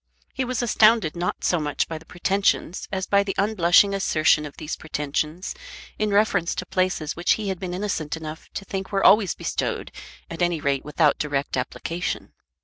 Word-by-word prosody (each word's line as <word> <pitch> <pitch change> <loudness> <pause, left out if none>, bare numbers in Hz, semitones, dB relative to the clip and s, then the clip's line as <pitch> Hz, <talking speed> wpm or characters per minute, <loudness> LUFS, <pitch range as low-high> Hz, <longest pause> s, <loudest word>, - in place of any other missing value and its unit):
He 265 - -1
was 255 -1 -2
astounded 215 -7 +4
not 175 +1 -3
so 175 - +2
much 150 -1 -1
by 160 -1 -5
the 160 - -19
pretensions 190 0 0
as 190 -1 -2
by 200 0 +3
the 200 -1 -3
unblushing 200 -1 +4
assertion 155 -5 +2
of 145 - -14
these 155 - -4
pretensions 155 +3 -3 0.5
in 215 0 +1
reference 200 -4 +2
to - - -4
places 185 -5 -1
which 175 - +2
he 210 -2 -3
had 190 -2 -3
been 180 -2 -4
innocent 180 -6 -2
enough 160 0 -8
to 195 - -5
think 195 0 -5
were 195 -1 0
always 205 -3 +5
bestowed - - -3 0.4
at 165 +1 -7
any 175 -2 +1
rate 140 -2 0
without 150 0 +2
direct 145 -2 -1
application. 165 +7 -4
175 Hz, 180 wpm, -24 LUFS, 155-200 Hz, 0.5 s, always